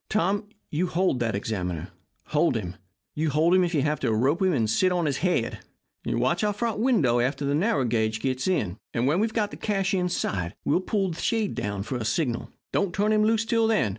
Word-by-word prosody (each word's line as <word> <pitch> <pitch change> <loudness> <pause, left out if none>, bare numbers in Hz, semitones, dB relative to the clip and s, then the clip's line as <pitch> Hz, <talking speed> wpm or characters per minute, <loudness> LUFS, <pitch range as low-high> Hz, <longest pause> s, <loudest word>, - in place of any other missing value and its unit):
Tom, 205 0 0 0.2
you 170 +4 0
hold 175 -6 +1
that 115 -3 0
examiner. 90 -5 -3 0.4
Hold 150 -4 +2
him. 90 -5 -5 0.6
Hold 155 +4 +3
him 185 0 +5
if 175 -1 -1
you 140 - +2
have 150 -1 0
to - - 0
rope 135 - +1
him 190 -1 +3
and 115 -6 +1
sit 185 - +2
on 175 -2 +1
his 145 -3 0
head. 175 -10 0 0.5
Watch 130 - 0
our 210 -1 +2
front 220 0 -2
window 190 - +3
after 135 +3 0
the 140 - +1
narrow 150 - +1
gauge 110 -2 0
gets 130 +3 -1
in, 110 - 0 0.2
and 120 +1 +1
when 150 +7 +2
we've 220 +1 +1
got 210 -3 0
the - - -8
cash 195 -3 -1
inside 175 - -1
we'll - - +3
pull 195 0 0
down - - -4
the 165 - -6
shade 220 -3 0 0.2
for 130 - -3
a 115 - -4
signal. 120 0 -1 0.2
Don't 195 -3 0
turn 210 +2 +2
him 215 0 +3
loose 225 +1 +2
till 230 -1 +2
then. 135 - +2
160 Hz, 220 wpm, -26 LUFS, 120-195 Hz, 0.6 s, him